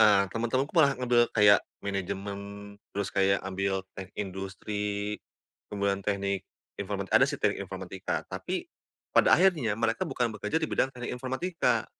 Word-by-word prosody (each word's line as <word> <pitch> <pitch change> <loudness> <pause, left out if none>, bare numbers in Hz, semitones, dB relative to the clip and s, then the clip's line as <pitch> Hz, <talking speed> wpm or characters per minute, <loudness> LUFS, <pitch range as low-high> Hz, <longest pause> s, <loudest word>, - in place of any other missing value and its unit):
Eee, 100 -2 +6
teman-temanku 130 +5 0
malah 140 -5 +5
ngambil 120 -1 +3
kayak, 105 -1 +7 0.2
manajemen, 100 0 -3 0.6
terus 100 -1 -1
kayak 95 0 +2
ambil 95 0 -1
teknik 95 +1 -9
industri, 100 +1 -3 0.5
kemudian 100 -1 0
teknik 100 -1 -1 0.3
informatik 100 -1 -3
ada - - +7
sih - - -3
teknik - - 0
informatika. - - -4
Tapi - - -4 0.4
pada - - +6
akhirnya 160 - +3
mereka 115 +1 0
bukan 120 -2 0
bekerja 105 +9 -2
di - - +2
bidang 130 - +2
teknik 125 0 -5
informatika. 130 -2 0
105 Hz, 140 wpm, -29 LUFS, 100-120 Hz, 0.6 s, kayak